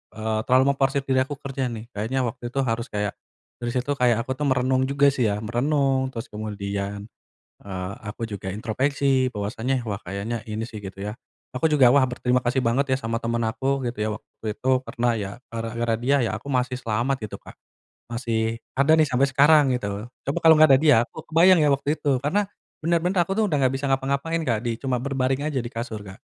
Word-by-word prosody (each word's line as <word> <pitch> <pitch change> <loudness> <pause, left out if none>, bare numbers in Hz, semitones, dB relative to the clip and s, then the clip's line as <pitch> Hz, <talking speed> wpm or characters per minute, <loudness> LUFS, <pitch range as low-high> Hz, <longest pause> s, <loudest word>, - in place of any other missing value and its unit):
eee, 110 0 -1
terlalu 130 +2 +5
memforsir 135 0 0
diri 130 -1 +1
aku 145 - -4
kerja 135 -1 -3
nih 115 0 -7
kayaknya 125 +6 -1
waktu 120 0 -4
itu 135 +3 -1
harus 115 0 -2
kayak, 105 -1 -2 0.5
dari 120 0 -3
situ 125 +3 -1
kayak 120 -2 +3
aku 130 - -5
tuh 145 - +1
merenung 130 0 +2
juga 140 0 +4
sih 125 -5 +1
ya, 105 +1 -2
merenung 135 +3 +1
terus 125 -2 -7
kemudian, 100 -1 -4 0.6
eee, 95 -1 -5
aku 110 +2 -5
juga 95 -2 -5
introspeksi 130 +3 0
bahwasanya 115 +5 -2
wah 100 - -2
kayaknya 105 +4 -4
ini 110 0 -4
sih 110 - -8
gitu 100 -1 -8
ya. 105 +4 -5 0.4
Aku 130 - -1
juga 135 -5 +6
wah 140 +2 +5
berterima 125 0 0
kasih 130 +2 +1
banget 130 +3 +1
ya - - +2
sama 115 +1 -1
temen 115 0 -1
aku 135 +4 0
gitu 120 - -9
ya - - -1
waktu 110 0 -7
itu 130 +5 -3 0.2
karena 120 +1 -2
ya 100 -2 -3 0.2
gara-gara 115 0 -2
dia 135 +4 +2
ya 115 - 0
aku 110 - -18
masih 125 0 0
selamat 120 +3 -1
gitu 105 - -9
Kak, - - -14 0.5
masih 115 -1 -1 0.2
ada 140 +4 +4
nih 160 - +5
sampai 130 +2 +3
sekarang 145 +2 +5
gitu. 100 0 -5 0.2
Coba 140 - -1
kalau 160 -1 +7
enggak 155 -2 +7
ada 135 - +6
dia 150 -6 +6
aku 160 - -10
kebayang 170 +2 +6
ya 150 - +4
waktu 140 +2 +1
itu 140 -3 +2
karena 200 +7 +1 0.3
bener-bener 170 +3 +1
aku 195 - -2
tuh 220 0 +2
udah 150 - +1
enggak 130 -1 +2
bisa 135 +1 -2
ngapa-ngapain 140 +5 0
Kak, 115 -3 +1
di 115 -2 -2
cuma 125 -2 -2
berbaring 135 0 0
aja 135 - -1
di 120 - -3
kasur 115 -2 -5
Kak, 95 -1 -12
125 Hz, 205 wpm, -24 LUFS, 110-140 Hz, 0.6 s, kalau